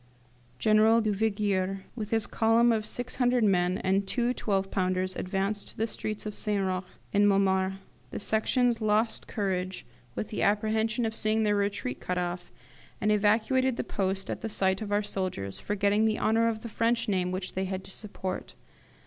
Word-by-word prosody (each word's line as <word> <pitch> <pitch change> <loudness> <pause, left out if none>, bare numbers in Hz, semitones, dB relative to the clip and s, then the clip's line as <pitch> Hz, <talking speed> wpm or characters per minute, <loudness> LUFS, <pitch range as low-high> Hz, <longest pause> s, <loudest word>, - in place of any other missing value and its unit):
General 220 +1 +5
Duvigier, 200 -3 0
with 215 -3 -4
his 225 -1 +1
column 230 +1 +3
of 215 -2 0
six 245 0 -4
hundred 245 -2 +3
men, 180 -2 +3
and 195 +1 0
two 240 +3 0
twelve 195 -5 -1
pounders, 185 0 0
advanced 195 +2 -2
to - - -12
the 220 - +1
streets 215 -1 -4
of 210 - -5
St. 205 -2 -1
Roch 185 0 -2 0.3
and 205 0 +5
Montmartre. 190 -1 +2 0.3
The - - -5
Sections 230 +3 +1
lost 215 +1 +1
courage 185 -3 -2 0.3
with 215 - -3
the 210 - -3
apprehension 220 +3 +1
of 220 0 -2
seeing 215 +1 +2
their 210 -1 +2
retreat 200 -11 -1
cut 180 - -3
off, 175 0 -3 0.5
and 210 - +2
evacuated 225 +5 +2
the - - -1
post 195 0 -2
at - - -5
the 225 - -3
sight 190 -1 +1
of 210 -1 -4
our 205 +1 +2
soldiers, 185 - -3
forgetting 205 +1 +1
the 220 -1 +1
honour 225 +1 +2
of 220 -1 -1
the 235 - -6
French 230 +2 +1
name 185 -3 0
which 185 0 -4
they 190 +1 -1
had 190 0 -4
to 195 - -11
support. 190 -2 -6
205 Hz, 180 wpm, -28 LUFS, 190-220 Hz, 0.5 s, General